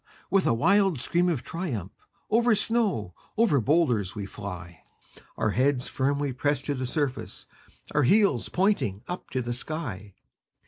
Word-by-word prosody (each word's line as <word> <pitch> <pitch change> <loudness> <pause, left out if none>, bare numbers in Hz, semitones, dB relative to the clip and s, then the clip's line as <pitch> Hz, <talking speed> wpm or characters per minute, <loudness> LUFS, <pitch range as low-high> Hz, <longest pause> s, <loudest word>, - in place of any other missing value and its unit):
with 195 0 +3
a - - +4
wild 195 - +3
scream 175 +7 +1
of 145 -8 -1
triumph, 125 - -4 0.4
Over 235 0 +4
snow, 210 - 0 0.2
over 210 - +4
boulders 125 - +2
we 100 -2 -4
fly, 95 -4 -8 0.6
Our 110 - +1
heads 130 +2 +1
firmly 140 0 0
pressed 145 +2 0
to 145 - 0
the 130 -2 -3
surface, 140 -1 -3 0.5
Our 145 - +3
heels 195 - +3
pointing 180 - +1
up 180 - -6
to 130 -1 -2
the 120 0 -2
sky! 120 - -5
140 Hz, 145 wpm, -27 LUFS, 115-180 Hz, 0.6 s, a